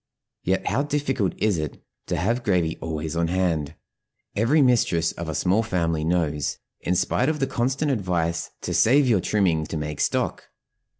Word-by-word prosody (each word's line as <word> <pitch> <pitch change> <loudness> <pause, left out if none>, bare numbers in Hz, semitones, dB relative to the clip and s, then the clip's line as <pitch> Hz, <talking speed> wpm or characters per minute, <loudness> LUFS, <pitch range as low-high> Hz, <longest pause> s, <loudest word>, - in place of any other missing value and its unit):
Yet 95 +1 0
how 135 - +1
difficult 140 - 0
it - - -4
is 85 -9 +1 0.4
to - - -1
have 115 +7 0
gravy 90 -8 +1
always 80 0 -3
on 85 0 +1
hand 85 -4 0 0.6
every 115 +9 +3
mistress 115 - +3
of 85 -1 -6
a 80 - -3
small 95 +4 +2
family 85 -7 -1
knows, 80 -4 0 0.2
in 90 - -1
spite 90 - +1
of 155 - 0
the 135 - +2
constant 135 +4 0
advice 90 -7 -1
to - - -3
"save 135 +4 +4
your 110 -7 +3
trimming 85 -8 +1
to 80 - -4
make 75 -1 -4
stock." - - 0
90 Hz, 170 wpm, -24 LUFS, 80-120 Hz, 0.6 s, save